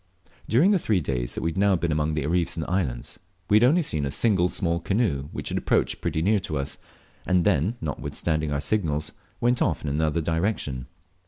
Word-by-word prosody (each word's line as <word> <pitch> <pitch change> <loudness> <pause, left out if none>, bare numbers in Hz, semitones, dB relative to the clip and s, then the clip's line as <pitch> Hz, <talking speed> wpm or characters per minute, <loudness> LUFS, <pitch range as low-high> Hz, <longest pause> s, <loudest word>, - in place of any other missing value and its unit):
During 150 - +5
the 195 - +3
three 105 - +1
days 65 -6 -3
we 80 - -1
had 80 - -4
now 100 -1 +4
been 85 -1 -1
among 75 0 0
the 75 -3 -1
reefs 85 +1 0
and 80 - -2
islands, 75 -10 -2 0.3
we 105 - +7
had 110 - +4
only 160 +8 +4
seen 75 - -1
a 70 - -1
single 95 +1 +2
small 85 -1 0
canoe, 95 - 0
which - - -5
had - - -1
approached - - 0
pretty 80 -2 -1
near 105 +3 +3
to 80 -5 -4
us, 70 +1 -3 0.5
and 90 -2 +3
then, 95 - +2
notwithstanding 80 0 -2
our 70 0 -1
signals, 80 -3 0 0.3
went 120 +1 +2
off 80 - +1
in 75 - -2
another 75 +2 0
direction. 80 - -1
85 Hz, 200 wpm, -25 LUFS, 75-100 Hz, 0.5 s, we